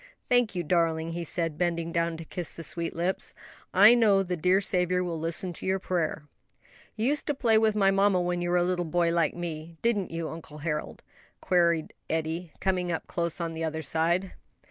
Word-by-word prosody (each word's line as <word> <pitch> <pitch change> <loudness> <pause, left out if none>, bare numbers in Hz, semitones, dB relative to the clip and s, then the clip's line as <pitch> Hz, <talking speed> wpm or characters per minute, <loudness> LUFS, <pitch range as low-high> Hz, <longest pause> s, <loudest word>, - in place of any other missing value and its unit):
"Thank 245 -5 +3
you, 175 - -1
darling," 165 -1 +1
he 170 +1 -4
said, 165 -2 -2
bending 170 -1 0
down 170 0 0
to 165 - -8
kiss 175 0 -5
the 165 - -7
sweet 165 +1 -3
lips. 175 +3 -1 0.4
"I 205 +5 +8
know 210 -5 +4
the 180 -1 -2
dear 180 +3 +3
Saviour 180 -2 +1
will 170 -2 -3
listen 170 +3 -1
to - - -8
your 190 0 +2
prayer." 170 -4 -2 0.7
"You 220 - -1
used 295 0 -1
to 295 - 0
play 230 -5 +3
with 220 -1 +2
my 195 -2 +4
mamma 195 -1 +3
when 175 0 -1
you 175 - -1
were 180 - +3
a 175 - +3
little 180 0 0
boy 170 0 +1
like 165 -3 +1
me; 165 -1 -6
didn't 215 -5 +1
you, 165 -1 -4
uncle 160 -2 -9
Harold?" 150 0 -4 0.4
queried 170 -3 +2 0.2
Eddie, 160 +1 -2
coming 180 -2 0
up 165 - -3
close 170 -1 -2
on 165 -1 -3
the 165 0 -4
other 160 0 -3
side. 170 +5 0
175 Hz, 205 wpm, -28 LUFS, 165-185 Hz, 0.7 s, I